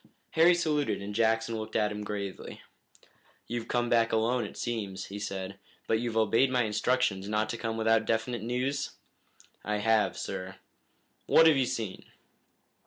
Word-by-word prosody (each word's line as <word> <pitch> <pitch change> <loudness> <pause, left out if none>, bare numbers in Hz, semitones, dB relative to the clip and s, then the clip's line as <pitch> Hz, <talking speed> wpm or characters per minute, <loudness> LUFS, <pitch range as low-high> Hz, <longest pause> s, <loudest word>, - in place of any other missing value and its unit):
Harry 170 +2 +5
saluted 150 -4 0
and 100 +1 -6
Jackson 115 +1 +1
looked 110 - -7
at 105 -1 +2
him 105 0 -5
gravely. 100 -2 -6 0.8
"You've 120 -1 -4
come 120 -1 0
back 115 -1 +3
alone, 115 +1 +1
it - - -9
seems," 100 -6 -3
he 100 +1 -7
said, 95 -1 -5 0.3
"but 110 - +1
you've 115 -1 -2
obeyed 115 +4 +3
my 125 -1 +2
instructions 105 -2 0
not 110 0 0
to 120 - -3
come 115 0 -3
without 110 0 +2
definite 115 +1 -1
news?" 130 +5 -2 0.7
"I 105 0 -1
have, 110 +1 +2
sir." 95 +1 -5 0.7
"What 165 - +6
have 160 -2 +7
you 130 -2 +2
seen?" 110 -6 -4
115 Hz, 160 wpm, -29 LUFS, 105-120 Hz, 0.8 s, have